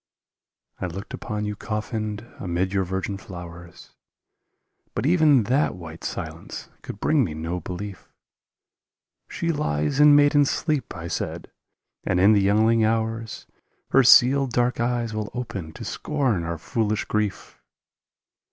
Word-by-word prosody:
I 90 - -2
looked 95 +4 -8
upon 105 0 -4
you 105 0 -3
coffined 105 +1 -4
amid 90 +1 -1
your 95 -1 +2
virgin 95 +2 -3
flowers, 85 -2 -11 1.0
But 110 - -1
even 155 -6 +5
that 130 +3 +1
white 80 -2 -10
silence - - -6
could 100 - -8
bring 150 +2 +3
me 80 -9 -3
no 85 +3 -3
belief: 95 +2 -7 1.2
"She 170 0 -1
lies 75 - -1
in 150 0 +8
maiden 145 0 +5
sleep," 150 -2 -1
I 85 - -6
said, - - -4 0.5
"and 90 - 0
in 100 +4 +6
the 100 - +4
young 105 +3 +3
ling 115 0 +3
hours 115 0 -1 0.5
Her 135 - +6
sealed 130 +1 +6
dark 120 0 +1
eyes 120 -1 -1
will 105 -1 -3
open 105 -10 -5
to - - -8
scorn 130 - -1
our 85 0 -3
foolish 110 +5 -1
grief." 105 -3 -3
105 Hz, 140 wpm, -24 LUFS, 95-125 Hz, 1.2 s, in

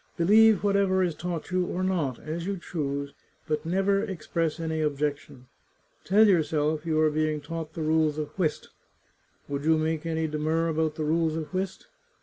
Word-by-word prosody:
Believe 210 +4 +5
whatever 200 -2 +2
is 175 -2 0
taught 170 +1 -5
you 185 0 +2
or 180 +1 -3
not, 165 -10 0
as 165 +3 -5
you 200 -1 -2
choose, 140 -5 -4 0.3
but 155 +1 -2
never 195 +3 +2
express 165 -5 -2
any 160 -1 -2
objection. 145 -3 -2 0.6
Tell 210 +5 +5
yourself 155 -3 +1
you 155 -1 +1
are 155 -1 +3
being 155 0 0
taught 160 +1 -6
the 160 - -4
rules 155 -1 +2
of 150 -1 -3
whist; 160 -6 -2 0.8
would 140 0 -3
you 160 +1 +4
make 160 0 -1
any 160 0 -1
demur 155 +2 0
about 160 -1 0
the 155 - -2
rules 160 0 +1
of 160 +2 -5
whist 185 0 -3
160 Hz, 170 wpm, -27 LUFS, 155-180 Hz, 0.8 s, Believe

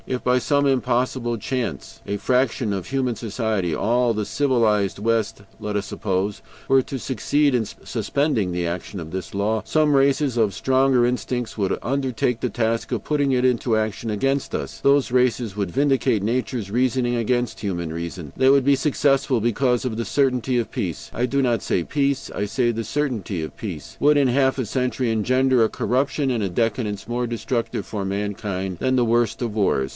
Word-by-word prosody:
If 130 -1 -3
by 125 0 +3
some 140 +3 +1
impossible 125 -2 0
chance 125 +3 -4
a 100 - -1
fraction 125 -2 +1
of 95 -3 -4
human 130 -3 -1
society 110 -6 -1
all 120 +1 +1
the 105 -1 -1
civilized 115 -8 +1
West, 110 -1 -1 0.2
let 105 0 -4
us 100 -1 -1
suppose 95 0 -2 0.3
were 135 0 +5
to 135 - -5
succeed 140 +4 +1
in 120 -3 +1
suspending 125 - -1
the 90 0 -1
action 90 +3 -4
of 80 -1 -7
this 95 +1 -5
law, 105 +2 0
some 155 -2 +2
races 135 -1 +2
of 110 -4 +2
stronger 130 -2 +3
instincts 125 -1 -2
would 100 -3 0
undertake 125 -2 -1
the 125 - -1
task 115 0 -1
of - - -2
putting 145 -2 +1
it 125 -1 +2
into 120 -2 +2
action 110 +1 -2
against 135 +6 -1
us: - - -5
those 140 -2 +3
races 125 -4 +1
would 100 -3 -2
vindicate 135 -4 +1
nature's 115 -2 -2
reasoning 125 +1 +1
against 120 +1 0
human 85 -5 -3
reason; 85 -2 -6
they 130 - +4
would 135 -1 +4
be 140 0 +5
successful, 135 -2 +2
because 120 +2 +1
the 115 -2 -2
certainty 130 -1 +1
of 120 - -1
peace 85 -5 -4
I 125 +2 0
do 140 +2 +1
not 120 -4 +1
say 90 - 0
PEACE, 140 - -1
I 105 - -1
say 120 +3 +1
the 115 0 -3
CERTAINTY 110 - -2
OF 80 - -7
PEACE 85 -10 -7
would, 150 +1 +4
in 140 -3 +4
half 135 +1 +2
a 130 - -1
century, 125 0 -1
engender 130 +3 +3
a 110 - +2
corruption 135 +2 0
and 115 -4 0
a 100 - -1
decadence 105 0 -1
more 120 +1 -1
destructive 115 +1 -2
for 105 -3 -4
mankind 95 -2 -3
than 130 0 +1
the 125 -2 +3
worst 120 0 +1
of 115 -3 -2
wars. 70 -10 +1
120 Hz, 185 wpm, -23 LUFS, 105-130 Hz, 0.3 s, were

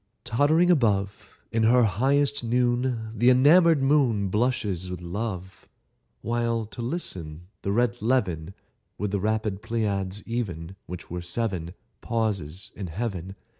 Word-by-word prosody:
Tottering 155 +9 +3
above 100 - +1 0.2
In 115 - +1
her 120 +2 +5
highest 135 - +2
noon, 120 -1 0
The 120 +3 +4
enomoured 150 +4 +6
moon 130 -9 +3
Blushes 105 -5 0
with 90 -2 -5
love, 95 +1 -5 0.5
While, 115 0 0
to 110 +3 -9
listen, 90 - -5
the 100 - -2
red 120 +2 +1
levin 95 -8 0 0.4
(With 105 0 -2
the 100 - 0
rapid 105 -1 -1
Pleiads, 105 -3 -2
even, 95 -7 -4
Which 90 -2 -8
are 90 0 -3
seven) 90 -2 -3 0.3
Pauses 100 -6 -2
in 95 - -5
Heaven. 95 0 -4
110 Hz, 130 wpm, -26 LUFS, 95-120 Hz, 0.5 s, enomoured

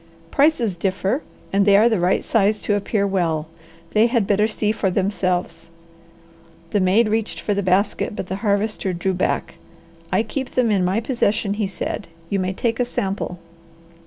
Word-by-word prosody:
"Prices 275 - +2
differ, 195 - -1 0.3
and 200 0 +4
they 200 0 +6
are 220 +3 +6
the 220 -5 +1
right 180 +2 +2
size 215 -1 +2
to 210 - 0
appear 205 0 0
well. 165 -5 0 0.4
They 220 +2 +4
had 235 -4 +1
better 210 +2 +2
see 215 -1 0
for 205 -2 0
themselves." 180 -3 -1 1.0
The 205 - +2
maid 195 +5 +3
reached 220 0 -1
for 205 - -1
the 200 - 0
basket, 195 +2 +1
but - - -4
the 190 +1 -4
Harvester 205 -2 0
drew 190 +2 -1
back. 180 - -2 0.5
"I 220 - +2
keep 260 +4 -5
them 245 -3 +3
in 195 -3 +2
my 190 +5 +1
possession," 215 -4 0
he 205 -1 -1
said. 190 - -4 0.2
"You 200 - +1
may 185 0 -1
take 230 +4 -1
a 245 - +2
sample." 195 -5 -3
200 Hz, 175 wpm, -21 LUFS, 190-220 Hz, 1.0 s, they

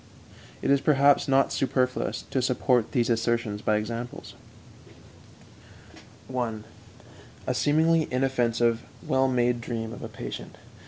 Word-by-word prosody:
It - - +2
is, 140 -1 +4
perhaps, 140 -1 +4
not 135 0 +3
superfluous 130 -1 -1
to 130 - +1
support 125 -2 +1
these 120 -4 +1
assertions 115 -2 0
by 110 - +1
examples: 115 +3 -5 1.9
1. 120 -4 -3 0.8
_A - - 0
seemingly 160 +2 +3
inoffensive, 120 -3 +1 0.2
well 130 0 +2
made 120 -2 +1
dream 115 -1 -4
of - - -9
a - - -6
patient. - - -8
125 Hz, 115 wpm, -26 LUFS, 115-135 Hz, 1.9 s, is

